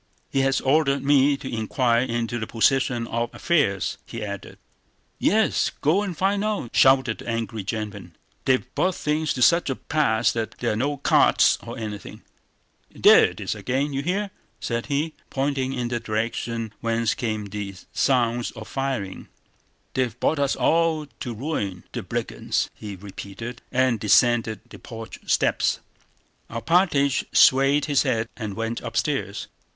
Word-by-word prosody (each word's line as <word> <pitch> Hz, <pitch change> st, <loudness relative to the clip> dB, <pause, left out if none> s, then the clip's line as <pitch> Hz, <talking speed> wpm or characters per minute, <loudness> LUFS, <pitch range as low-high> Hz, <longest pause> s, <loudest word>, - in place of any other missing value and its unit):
"He 135 Hz, -, +1 dB
has 135 Hz, 0 st, +2 dB
ordered 140 Hz, 0 st, +2 dB
me 140 Hz, 0 st, +4 dB
to 135 Hz, -, -8 dB
inquire 115 Hz, +2 st, +1 dB
into 120 Hz, -1 st, -2 dB
the 110 Hz, -, -4 dB
position 120 Hz, 0 st, +2 dB
of 115 Hz, +1 st, -2 dB
affairs," 140 Hz, -, +1 dB
he 115 Hz, -2 st, -6 dB
added. 100 Hz, -2 st, -7 dB, 0.6 s
"Yes, 220 Hz, +3 st, +2 dB
go 165 Hz, +8 st, +2 dB
and 190 Hz, -6 st, -4 dB
find 200 Hz, +2 st, +1 dB
out!" 210 Hz, -, -2 dB
shouted 130 Hz, -3 st, +4 dB
the -, -, -7 dB
angry 115 Hz, -2 st, -3 dB
gentleman. 100 Hz, -4 st, -5 dB, 0.3 s
"They've 130 Hz, -1 st, +2 dB
brought 185 Hz, -1 st, +1 dB
things 150 Hz, 0 st, -1 dB
to 125 Hz, -, +2 dB
such 170 Hz, +1 st, +4 dB
a 135 Hz, -, -1 dB
pass 120 Hz, -8 st, +1 dB
that 115 Hz, -1 st, -4 dB
there 120 Hz, -, -1 dB
are -, -, -2 dB
no 140 Hz, +6 st, -1 dB
carts 140 Hz, -, +4 dB
or -, -, -8 dB
anything!... 105 Hz, -2 st, -7 dB, 0.7 s
There -, -, +7 dB
it -, -, -5 dB
is -, -, -2 dB
again, 135 Hz, +3 st, -1 dB
do 135 Hz, -, -3 dB
you -, -, 0 dB
hear?" 195 Hz, +6 st, -1 dB, 0.3 s
said 115 Hz, -1 st, -3 dB
he, 150 Hz, +2 st, -1 dB, 0.2 s
pointing 135 Hz, -1 st, -1 dB
in 125 Hz, -2 st, -2 dB
the 120 Hz, -1 st, -1 dB
direction 115 Hz, 0 st, -3 dB
whence 115 Hz, -1 st, +1 dB
came 110 Hz, -3 st, -3 dB
the 100 Hz, -1 st, -6 dB, 0.2 s
sounds 120 Hz, -2 st, +1 dB
of 110 Hz, -1 st, -9 dB
firing. 130 Hz, -9 st, -3 dB, 0.7 s
"They've 125 Hz, -3 st, -1 dB
brought 155 Hz, -, +1 dB
us 140 Hz, -1 st, +1 dB
all 165 Hz, -2 st, +2 dB
to 120 Hz, -, -4 dB
ruin... 105 Hz, -, -3 dB
the -, -, -4 dB
brigands!" -, -, -2 dB
he 105 Hz, -2 st, -8 dB
repeated, 100 Hz, +5 st, -8 dB
and 130 Hz, -3 st, +2 dB
descended 110 Hz, 0 st, +3 dB
the -, -, -12 dB
porch 115 Hz, -1 st, -9 dB
steps. -, -, +2 dB, 0.7 s
Alpátych 140 Hz, +1 st, +2 dB
swayed 135 Hz, +2 st, +5 dB
his 145 Hz, -3 st, +2 dB
head 110 Hz, 0 st, 0 dB
and 110 Hz, -4 st, -5 dB
went 115 Hz, +2 st, -3 dB
upstairs. 115 Hz, -3 st, -2 dB
120 Hz, 155 wpm, -24 LUFS, 110-140 Hz, 0.7 s, There